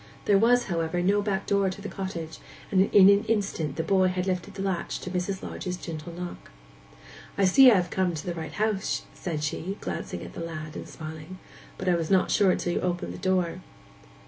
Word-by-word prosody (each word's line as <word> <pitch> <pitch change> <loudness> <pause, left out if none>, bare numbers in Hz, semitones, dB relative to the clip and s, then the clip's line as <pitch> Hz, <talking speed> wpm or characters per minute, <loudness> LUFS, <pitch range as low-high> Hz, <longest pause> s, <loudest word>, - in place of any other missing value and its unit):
There 200 -1 +5
was, 245 +3 +4
however, 165 -1 -1
no 200 +3 +3
backdoor 200 -1 +1
to 185 - -7
the 205 - -6
cottage, 175 -6 -5 0.3
and 190 0 +4
in 195 -2 +8
an 200 +1 +6
instant 195 -10 -1
the 160 - -1
boy 190 +2 +3
had 180 0 -1
lifted 185 +1 -3
the 195 - -4
latch 190 -3 -2
to 180 - -6
Mrs. 185 +1 -2
Lodge's 180 0 -4
gentle 165 -1 -7
knock. 175 +1 -7 0.9
'I 200 - +4
see 255 +8 +8
I 230 - +6
have 180 -2 0
come 185 -3 0
to 155 - -6
the 175 - -2
right 160 -2 -6
house,' 210 -1 -1
said 155 -4 -4
she, 180 +6 -3
glancing - - -5
at - - -9
the - - -8
lad, 155 -2 -6
and - - -7
smiling. 160 +3 -8 0.4
'But 190 - -5
I 180 - +4
was 165 -2 -1
not 190 -1 +3
sure 195 -3 +4
till 175 - -2
you - - -1
opened 175 -1 -2
the - - -9
door. 185 -1 0
185 Hz, 210 wpm, -27 LUFS, 170-195 Hz, 0.9 s, in